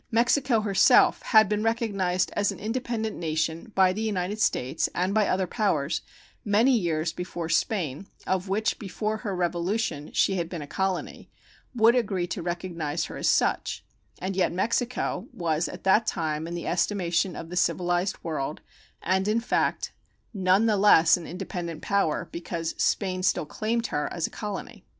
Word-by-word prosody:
Mexico 240 0 +2
herself 200 -2 +5
had 220 -3 +5
been 210 +1 0
recognized 200 -5 0
as 205 0 +1
an - - -8
independent 225 -1 -3
nation 160 +5 -2
by 185 -1 +5
the 215 - -4
United 205 -1 -2
States 145 - +1
and 185 +3 0
by 215 -1 +3
other 185 0 +1
powers 170 -7 0 0.4
many 225 +6 +4
years 165 -5 0
before 175 -2 -5
Spain, 175 -4 -1 0.2
of 190 0 -1
which 215 +3 0
before 215 +2 -3
her 205 -4 -4
revolution 175 -2 -1
she 195 - +2
had 170 -1 -2
been 170 -4 -5
a - - -7
colony, 190 +4 -3 0.5
would 230 0 +5
agree 200 -7 0
to 175 +1 -4
recognize 170 -3 -3
her - - -8
as - - -1
such; - - +1 0.3
and 190 +1 -4
yet 185 - +2
Mexico 235 +2 -1
was 165 -1 -1
at - - -9
that 210 +4 +4
time 155 -1 -2
in 170 - -5
the 170 - -5
estimation 180 -1 0
of 165 - -7
the - - -5
civilized 175 +1 +1
world, 155 -3 -3 0.4
and 190 +1 +1
in 215 +2 +2
fact, 230 - 0 0.4
none 190 +1 +3
the 215 -2 +3
less 170 -5 +6
an 175 - -7
independent 175 -2 -5
power 200 -6 0
because 170 -1 -4
Spain 185 -2 0
still 185 -4 +1
claimed 230 +8 -2
her 150 -8 -2
as 170 -2 -2
a - - -5
colony. 210 0 -6
185 Hz, 165 wpm, -26 LUFS, 170-215 Hz, 0.5 s, less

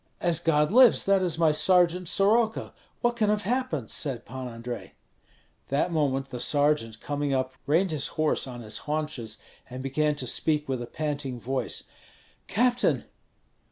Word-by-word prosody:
"As 170 -2 +2
God 150 -2 +2
lives, 250 0 +6
that 195 -1 +3
is 175 -3 -1
my 165 -2 +4
sergeant 180 +2 +3
Soroka; 220 +5 +1 0.3
what 240 0 +1
can 215 -3 +1
have 210 0 +1
happened?" 210 - -1
said 130 -5 -1
Pan 130 +1 -6
Andrei. 120 0 -7 0.7
That 145 +6 0
moment 135 -4 0
the 125 - -5
sergeant 145 -6 +1
coming 145 -1 -2
up, 130 0 -1
reined 170 +5 +2
his 150 -3 0
horse 155 -3 +1
on 120 -2 -7
his 110 -1 -3
haunches, 150 -8 -3 0.3
and 130 +1 -7
began 150 +2 0
to 140 -3 -3
speak 150 +4 0
with 130 -2 -2
a 120 - -5
panting 145 -3 -3
voice: 130 +1 -3 0.6
"Captain! 245 +3 +1
150 Hz, 160 wpm, -27 LUFS, 130-180 Hz, 0.7 s, lives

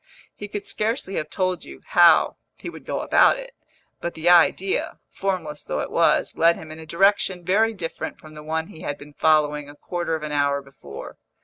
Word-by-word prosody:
He 205 - -7
could 205 0 -6
scarcely 215 -2 -2
have 155 - -3
told 185 -2 -1
you - - -11
how - - +5 0.2
he - - -8
would - - -12
go - - -2
about - - +4
it; - - -9 0.5
but 170 - -4
the 160 +2 +1
idea, 180 +2 +3
formless 175 -6 -3
though 75 - -3
it - - -5
was, - - +2
led 170 +1 +5
him 155 -1 -10
in 155 - -9
a 160 - -11
direction 190 +1 +2
very 220 +5 +2
different 165 -4 -5
from 155 0 -14
the 150 - -10
one 160 +1 -2
he 160 - -13
had 145 - -4
been 145 0 -13
following 150 -2 +2
a 145 - -12
quarter 175 +1 -3
of 155 - -6
an 150 - -4
hour 145 -1 +1
before. 135 - -11
165 Hz, 205 wpm, -23 LUFS, 150-190 Hz, 0.5 s, how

